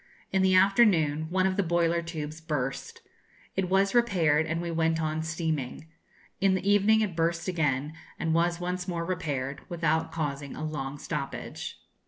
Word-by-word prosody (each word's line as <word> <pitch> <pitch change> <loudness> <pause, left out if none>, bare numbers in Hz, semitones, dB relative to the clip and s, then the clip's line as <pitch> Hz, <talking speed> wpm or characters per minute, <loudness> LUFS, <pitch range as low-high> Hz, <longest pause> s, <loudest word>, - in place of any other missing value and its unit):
In 190 - +2
the 190 0 +4
afternoon 185 -6 +4
one 185 +1 +2
of 190 0 0
the - - +4
boiler 170 -1 +1
tubes 155 -2 -6
burst. 145 -5 -4 0.5
It 185 -1 0
was 195 +1 +3
repaired, 165 -10 +3
and 165 +1 -1
we 170 0 -3
went 165 0 +1
on 155 0 -1
steaming. 160 -4 -3 0.5
In 195 -1 +3
the 190 +1 -3
evening 205 +2 +5
it 200 -6 -1
burst 170 +1 0
again, 150 -4 0 0.2
and 160 0 0
was 170 +1 +2
once 180 +1 -3
more 170 -2 -2
repaired, 145 -7 -3
without 160 -1 0
causing 145 -3 -3
a - - -6
long 145 -2 -4
stoppage. - - -5
165 Hz, 165 wpm, -28 LUFS, 155-185 Hz, 0.5 s, evening